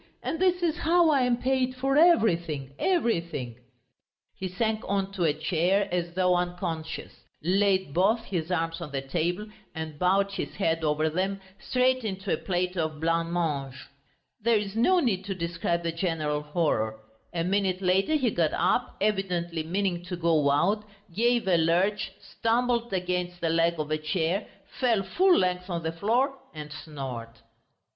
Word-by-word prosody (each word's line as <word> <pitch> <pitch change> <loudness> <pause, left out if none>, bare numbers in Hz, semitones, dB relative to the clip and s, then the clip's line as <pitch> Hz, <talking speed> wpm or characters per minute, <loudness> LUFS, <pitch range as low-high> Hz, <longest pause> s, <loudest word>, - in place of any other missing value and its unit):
And 325 - -2
this 360 -1 +2
is 330 -1 +1
how 335 0 +4
I 280 -3 +3
am 250 -1 +2
paid, 255 0 0
for 270 +1 0
everything, 170 - +3
everything!..." 170 - 0 0.8
He 190 - -4
sank 215 +4 -1
on 195 0 0
to 190 -3 -1
a 155 - +4
chair 185 +4 +1
as 175 -1 -2
though 180 -1 +3
unconscious, 175 -3 -3 0.3
laid 190 -2 +2
both 210 +7 +2
his 170 -4 -3
arms 165 -1 -1
on 165 - -5
the 135 -1 -3
table, 175 +8 -1 0.3
and 160 -2 -6
bowed 195 +2 +2
his - - -5
head 165 -4 0
over 155 +1 +1
them, 190 +5 -1 0.2
straight 255 +2 +1
into 195 -2 -2
a - - +1
plate 180 0 -2
of 155 -3 -2
blancmange. 165 -4 -1 0.7
There 230 +1 +3
is 205 -1 -4
no 360 +11 +4
need 215 - 0
to 195 -1 -3
describe 170 0 -2
the 165 - -1
general 165 -4 -1
horror. 150 -8 -1 0.3
A 165 -1 -1
minute 190 0 +1
later 190 +11 +2
he 260 -7 +2
got 165 -4 +1
up, 180 +3 +1
evidently 180 -5 0
meaning 175 +1 -1
to 180 - -4
go 165 -4 +2
out, 190 +9 +2 0.3
gave 235 +2 +2
a 180 -2 +4
lurch, 180 +5 +1
stumbled 235 0 0
against 180 -1 -2
the 165 - 0
leg 165 +1 +2
of 155 0 -3
a 155 - +1
chair, 165 +5 -1 0.3
fell 230 -6 +2
full 360 - +3
length 180 0 0
on 170 -2 -3
the 160 - -1
floor 245 - 0 0.2
and 150 -1 -7
snored.... 135 -7 -6
180 Hz, 165 wpm, -27 LUFS, 165-210 Hz, 0.8 s, how